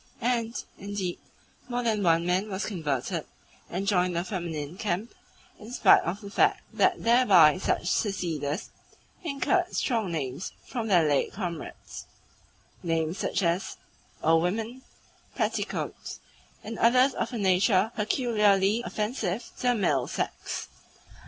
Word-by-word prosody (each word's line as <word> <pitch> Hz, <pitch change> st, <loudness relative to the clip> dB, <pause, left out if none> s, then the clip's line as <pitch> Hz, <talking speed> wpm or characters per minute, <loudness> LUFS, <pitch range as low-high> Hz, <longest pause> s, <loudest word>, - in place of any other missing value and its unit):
And, 235 Hz, -1 st, 0 dB, 0.2 s
indeed, 195 Hz, -3 st, -4 dB, 0.5 s
more 245 Hz, 0 st, -1 dB
than 220 Hz, -3 st, +1 dB
one 170 Hz, -2 st, +3 dB
man 185 Hz, +4 st, +1 dB
was 190 Hz, 0 st, -3 dB
converted, 155 Hz, -, -2 dB, 0.5 s
and 185 Hz, +3 st, -3 dB
joined 180 Hz, -3 st, +2 dB
the 170 Hz, -, 0 dB
feminine 170 Hz, -5 st, -4 dB
camp, 205 Hz, +2 st, -3 dB, 0.5 s
in 220 Hz, +2 st, -10 dB
spite 250 Hz, -, +6 dB
of 185 Hz, +5 st, -4 dB
the 200 Hz, -1 st, -9 dB
fact -, -, +2 dB
that -, -, +2 dB
thereby 195 Hz, -9 st, +6 dB
such 185 Hz, -, 0 dB
seceders 170 Hz, -5 st, -1 dB, 0.5 s
incurred 350 Hz, +4 st, 0 dB
strong 225 Hz, -8 st, 0 dB
names 140 Hz, 0 st, -4 dB
from 235 Hz, -3 st, -4 dB
their 175 Hz, -6 st, +4 dB
late 145 Hz, -2 st, +1 dB
comrades 175 Hz, -6 st, -6 dB, 0.7 s
names 165 Hz, 0 st, -1 dB
such -, -, -1 dB
as 170 Hz, +2 st, 0 dB, 0.5 s
"old 165 Hz, +1 st, +4 dB
women," 225 Hz, +8 st, -2 dB, 0.5 s
"petticoats," 215 Hz, -3 st, -3 dB, 0.4 s
and 220 Hz, +1 st, -6 dB
others 255 Hz, +3 st, +5 dB
of 235 Hz, -, -3 dB
a 240 Hz, -, -4 dB
nature 195 Hz, +1 st, +3 dB
peculiarly 210 Hz, -2 st, +2 dB
offensive 215 Hz, -1 st, -3 dB
to -, -, -10 dB
the 245 Hz, -, +4 dB
male 150 Hz, -, +1 dB
sex. -, -, -4 dB
195 Hz, 130 wpm, -27 LUFS, 170-225 Hz, 0.7 s, spite